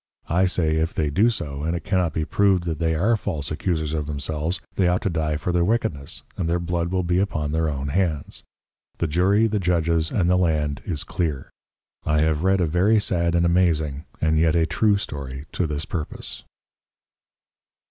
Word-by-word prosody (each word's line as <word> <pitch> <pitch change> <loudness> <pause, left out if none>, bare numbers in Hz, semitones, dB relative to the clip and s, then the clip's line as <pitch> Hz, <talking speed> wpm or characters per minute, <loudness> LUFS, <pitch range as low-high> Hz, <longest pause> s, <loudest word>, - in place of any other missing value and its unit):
I 90 +3 +3
say, 80 -4 +1
if 80 +1 -1
they 75 -2 0
do 105 +10 +4
so, 75 -11 -4
and 80 +3 -1
it 85 - -4
cannot 90 -4 +1
be 80 +1 -2
proved 95 0 +2
that 80 -3 -3
they 80 -1 +1
are 105 +9 +2
false 80 -9 -3
Accusers 80 -1 -1
of 75 -2 -2
themselves, 75 +4 -2
they 95 - +2
ought 90 +1 +1
to 95 - 0
dye 80 -2 -1
for 85 +4 -2
their 90 0 +2
Wickedness, 85 -8 -1
and 85 -3 -2
their 85 - +2
Blood 85 0 -2
will 95 0 0
be 90 +1 +1
upon 75 -7 -1
their 80 0 +1
own 70 -1 -3
Heads; 80 -3 -1 0.6
the - - 0
Jury, 95 +7 +3
the 110 -1 0
Judges, 85 -3 +1
and 90 -5 +1
the 90 +1 +4
Land 75 -5 0
is 80 -6 -2
Clear: 75 -6 -3 0.5
I 75 0 +2
have 80 -1 +1
read 95 +1 +2
a - - +3
very 95 +7 +3
sad 85 -4 +1
and 85 0 +3
amazing, 80 -5 +1
and 80 0 +2
yet 80 +1 +3
a 80 -1 +3
true 105 +4 +2
Story 70 -6 -6
to 90 - -1
this 75 +1 -3
purpose. 80 -4 -5
85 Hz, 200 wpm, -23 LUFS, 75-90 Hz, 0.6 s, do